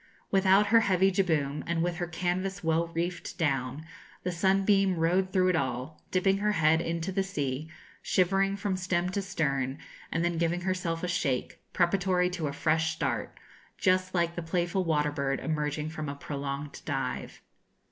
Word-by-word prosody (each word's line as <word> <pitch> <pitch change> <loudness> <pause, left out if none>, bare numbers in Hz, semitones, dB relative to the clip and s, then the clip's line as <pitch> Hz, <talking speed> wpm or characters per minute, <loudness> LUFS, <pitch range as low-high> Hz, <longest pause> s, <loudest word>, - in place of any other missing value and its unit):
Without 195 +1 +5
her 230 - +9
heavy 190 -3 +3
jibboom, 155 -7 0
and 170 -1 0
with 175 -1 -1
her 175 -1 -2
canvas 185 +3 -2
well 165 +1 +2
reefed 170 +1 -4
down, 140 -1 -1 0.4
the 180 - -1
'Sunbeam' 195 +1 +3
rode 180 +3 +2
through 185 -1 +3
it 180 - +2
all, 130 +1 -3
dipping 195 +1 +2
her 210 +1 +1
head 160 -1 +3
into 165 +2 -2
the 195 +1 +1
sea, 150 -6 -3 0.3
shivering 195 +2 +2
from 200 -1 -1
stem 180 -1 0
to 200 +2 -1
stern, 140 -8 -1 0.3
and 165 +1 0
then 175 -1 0
giving 170 +1 0
herself 180 -2 -2
a - - 0
shake, 160 -8 -1
preparatory 180 0 +2
to 170 -4 -2
a - - -2
fresh 160 +2 +1
start, - - -2 0.4
just 185 -1 +2
like 170 -1 +1
a 175 - -3
playful 175 +2 0
water 150 -3 +1
bird 140 -2 -1
emerging 150 -1 -2
from 155 -2 -5
a 140 - -4
prolonged 140 0 -5
dive. - - -4
170 Hz, 165 wpm, -29 LUFS, 155-185 Hz, 0.4 s, her